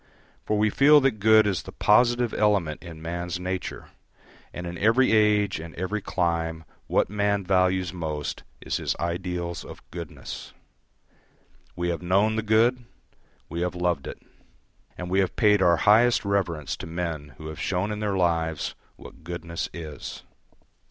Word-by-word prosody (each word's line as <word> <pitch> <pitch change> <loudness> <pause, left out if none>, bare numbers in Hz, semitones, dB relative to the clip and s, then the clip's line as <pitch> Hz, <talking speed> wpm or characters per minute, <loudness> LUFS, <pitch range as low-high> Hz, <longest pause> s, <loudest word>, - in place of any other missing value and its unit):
For 105 - +1
we 105 0 +2
feel 145 +5 +6
that 130 -5 +1
good 110 +1 +6
is 95 -4 0
the - - -10
positive 120 +2 +3
element 100 -8 +1
in 80 -2 -10
man's 85 +1 -3
nature, 90 0 -4 0.6
and 90 - -7
in 85 0 -5
every 115 +5 +4
age 105 -4 +3
and 80 0 -9
every 95 +4 -2
clime 85 -3 -1 0.2
what - - +2
man 100 -1 +1
values 95 -1 +1
most 80 -4 -4 0.2
is - - -2
his - - -2
ideals 85 0 -3
of - - -12
goodness. - - -8 1.2
We 85 0 -1
have 85 -1 -2
known 100 +5 +2
the 110 - 0
good, 115 +3 +3 0.6
we 85 +2 -4
have 90 0 -1
loved 90 -5 -1
it, - - -7 0.8
and 90 - -5
we 95 +2 +1
have 95 -2 0
paid 105 -3 +4
our 85 -2 +5
highest 110 +8 +4
reverence 90 -7 -1
to - - -7
men 80 -5 -4
who 80 - -10
have 80 - -8
shown 95 +3 -1
in 105 - -4
their 105 -2 -1
lives 80 -3 0 0.2
what - - -14
goodness 85 0 -5
is. 80 -4 -8
90 Hz, 160 wpm, -26 LUFS, 85-105 Hz, 1.2 s, feel